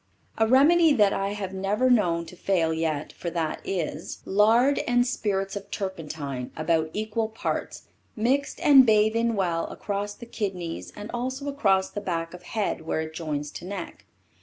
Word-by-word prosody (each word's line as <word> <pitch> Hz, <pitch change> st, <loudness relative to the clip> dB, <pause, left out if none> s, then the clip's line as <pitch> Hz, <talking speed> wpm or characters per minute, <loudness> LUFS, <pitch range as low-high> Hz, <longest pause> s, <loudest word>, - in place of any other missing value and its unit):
A 220 Hz, -, +4 dB
remedy 305 Hz, +6 st, +6 dB
that 210 Hz, -6 st, +4 dB
I 195 Hz, +1 st, -1 dB
have 195 Hz, -2 st, -5 dB
never 200 Hz, +6 st, +1 dB
known 175 Hz, -9 st, +3 dB
to 165 Hz, -, -12 dB
fail 170 Hz, -3 st, +1 dB
yet 160 Hz, -2 st, -2 dB
for 175 Hz, -, -5 dB
that 165 Hz, -2 st, -2 dB
is: 165 Hz, -4 st, -4 dB
Lard 225 Hz, +7 st, +4 dB
and 245 Hz, 0 st, +3 dB
spirits 195 Hz, -5 st, -1 dB
of 200 Hz, -1 st, -7 dB
turpentine 150 Hz, -9 st, -5 dB
about 160 Hz, 0 st, +1 dB
equal 220 Hz, +1 st, -2 dB
parts 220 Hz, -, -4 dB, 0.3 s
mixed 260 Hz, +6 st, 0 dB
and 275 Hz, -3 st, +8 dB
bathe 220 Hz, -1 st, +4 dB
in 230 Hz, 0 st, +1 dB
well 175 Hz, -4 st, 0 dB
across 205 Hz, 0 st, -4 dB
the 235 Hz, -, -10 dB
kidneys 190 Hz, -7 st, -4 dB
and 210 Hz, +1 st, -7 dB
also 260 Hz, +3 st, -3 dB
across 195 Hz, -9 st, +2 dB
the 205 Hz, -, -4 dB
back 165 Hz, -3 st, -3 dB
of 180 Hz, -, -10 dB
head 200 Hz, -1 st, -2 dB
where 160 Hz, 0 st, -2 dB
it 160 Hz, 0 st, -6 dB
joins 150 Hz, -3 st, -4 dB
to 175 Hz, -, -8 dB
neck. 190 Hz, -2 st, -7 dB
195 Hz, 170 wpm, -26 LUFS, 170-230 Hz, 0.3 s, and